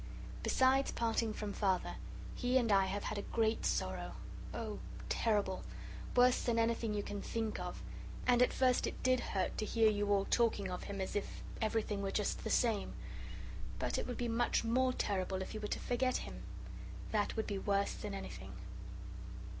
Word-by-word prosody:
Besides 265 +1 +4
parting 230 -1 +1
from 210 -1 -3
Father, 190 -3 +1 0.4
he 250 +1 +2
and 235 -4 +3
I 195 -1 +5
have 200 +2 -2
had 210 - -2
a - - -7
great 225 -1 +2
sorrow - - -1 0.4
oh, - - -4 0.3
terrible 205 -4 +1 0.5
worse 250 0 +6
than 235 -2 +1
anything 230 -1 +2
you 205 - 0
can 205 0 -4
think 225 -2 -2
of, - - -5 0.4
and 245 -1 +5
at 250 - +6
first 255 -1 +3
it - - -5
did 255 0 +4
hurt 190 -5 -1
to - - +1
hear 225 0 +4
you 205 0 +1
all 200 -1 +4
talking 215 -5 +2
of 180 - -4
him 200 -1 -3
as 190 - -3
if 205 - -3 0.2
everything 215 -2 +1
were 195 - 0
just 205 +1 0
the - - -2
same. 225 -4 +2 0.8
But - - 0
it - - -3
would 245 - -3
be 240 - 0
much 235 +1 +2
more 255 +3 +3
terrible 190 -5 0
if - - -7
you 215 - -3
were 210 - -2
to - - -1
forget 255 +1 +1
him. - - -6 0.7
That 210 -2 +1
would 220 - 0
be 200 -2 -2
worse 200 0 +2
than 205 -2 -4
anything." 195 - -6
220 Hz, 185 wpm, -36 LUFS, 200-240 Hz, 0.8 s, worse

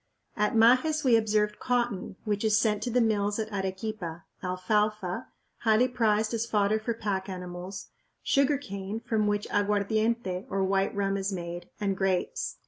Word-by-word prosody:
At 210 +1 +1
Majes 255 +8 +4
we 250 -4 +5
observed 210 -1 +1
cotton, 240 -7 -1
which 205 -1 -1
is 215 -1 +4
sent 215 -2 +1
to 245 - -2
the 245 +1 +2
mills 205 -2 +1
at 220 -1 -4
Arequipa, 190 -3 -4 0.2
alfalfa, 210 +2 -1 0.3
highly 225 +2 +4
prized 220 -3 +1
as 230 0 -1
fodder 210 -1 +2
for 230 +1 -2
pack 200 -3 -2
animals, 180 +1 -7 0.3
sugar 280 +1 +3
cane, 200 -4 -5
from 225 -3 0
which 205 0 0
aguardiente, 205 -1 0
or 195 0 0
white 195 +1 +1
rum, 200 0 0
is 195 +1 -2
made, 175 -1 -5
and 200 -2 0
grapes. 195 - -1
210 Hz, 155 wpm, -28 LUFS, 195-225 Hz, 0.3 s, we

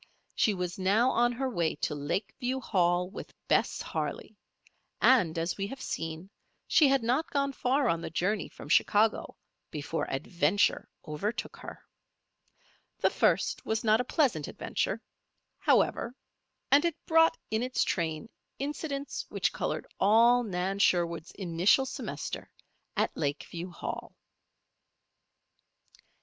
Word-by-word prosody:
She 210 - +2
was 180 0 -4
now 210 +7 +3
on 240 +1 +3
her 265 +3 -2
way 170 -10 0
to 150 - -2
Lakeview 225 - -2
Hall 180 -6 +1
with 190 - -9
Bess - - +1
Harley; - - -4 0.6
and, 185 -11 +4
as 165 +1 -1
we 195 0 -2
have 270 +5 -8
seen, 165 +4 -5 0.4
she 305 - +5
had 270 -3 +2
not 255 +8 +1
gone 280 -1 0
far 265 +1 +1
on 165 -5 +1
the - - -5
journey 185 +5 -1
from - - -11
Chicago 210 +7 +2 0.3
before 155 +2 -3
Adventure 165 +7 +1 0.2
overtook 205 +10 -3
her. - - -10 1.1
This - - +1
first - - +1
was 220 0 -1
not 220 +1 +4
a - - -2
pleasant 250 - +1
adventure, - - -2 0.6
however; 240 +2 +2 0.6
and 285 +1 +6
it 340 -3 0
brought 325 0 +4
in 220 +1 +1
its 255 +1 +1
train 165 +2 -2 0.3
incidents 280 0 -4
which - - 0
colored - - -2
all 230 +5 +5
Nan 195 -2 -2
Sherwood's 170 -3 +2
initial 185 +7 +2
semester 265 - -5 0.5
at - - +1
Lakeview 165 +4 -3
Hall. 175 - -6
205 Hz, 130 wpm, -29 LUFS, 170-255 Hz, 1.1 s, and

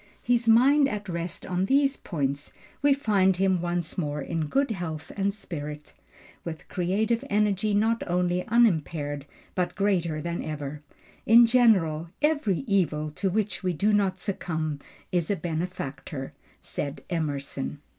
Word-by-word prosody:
His 240 -1 +1
mind 270 +5 +6
at 210 -2 -4
rest 170 -1 -4
on 180 +1 0
these 275 +2 +3
points, 140 -4 -3 0.3
we 285 0 +4
find 205 -8 +3
him 190 -1 +2
once 175 0 -2
more 150 -3 -2
in 155 +2 -2
good 275 - +1
health 165 -6 -5
and 200 0 +1
spirits, 150 -7 -7 0.5
with 160 -2 -7
creative 215 +7 0
energy 205 0 +2
not 225 +2 +2
only 180 0 +1
unimpaired 160 - +1 0.3
but 180 -1 -1
greater 180 -6 +1
than 170 +2 -3
ever. 150 -1 -5 0.5
"In 235 +2 +8
general, 190 -10 +3
every 290 - +1
evil 155 - +1
to 190 +6 -1
which 210 +2 -1
we 185 -2 0
do 210 +6 +2
not 195 -2 +2
succumb 160 -6 -3 0.3
is 175 -3 0
a 205 - +2
benefactor," 155 -5 -4 0.3
said 145 +1 -4
Emerson. 145 -4 -3
180 Hz, 140 wpm, -27 LUFS, 155-210 Hz, 0.5 s, In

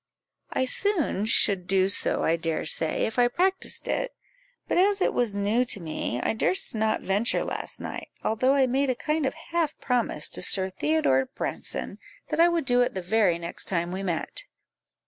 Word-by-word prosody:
"I 260 - 0
soon 320 - +1
should 195 -5 +3
do 190 0 +3
so, 195 - +3
I 165 - +2
dare 165 -1 -3
say, 160 - +2
if 220 +2 -3
I 245 - +5
practised 370 +9 -1
it; - - -2 0.5
but - - +1
as 400 +2 +3
it - - +1
was 235 -5 0
new 205 +5 +1
to 205 - +1
me, 155 -7 -4
I - - -1
durst 375 - +1
not 220 -1 0
venture 205 +5 0
last - - -5
night, - - -6 0.2
although 255 +5 +2
I 270 -1 +4
made 265 +2 0
a 255 - +1
kind 305 +1 -1
of - - -4 0.2
half 335 -3 0
promise 240 - -1
to - - -3
Sir 190 +1 +3
Theodore 300 +3 +1
Branson, - - -3 0.3
that - - -2
I 340 +1 +6
would 335 -4 -1
do 245 -2 +3
it 245 - 0
the 185 - -4
very 190 -2 +2
next 170 0 -7
time 170 -2 -2
we 190 +1 -4
met." 175 -4 -4
225 Hz, 190 wpm, -26 LUFS, 190-285 Hz, 0.5 s, I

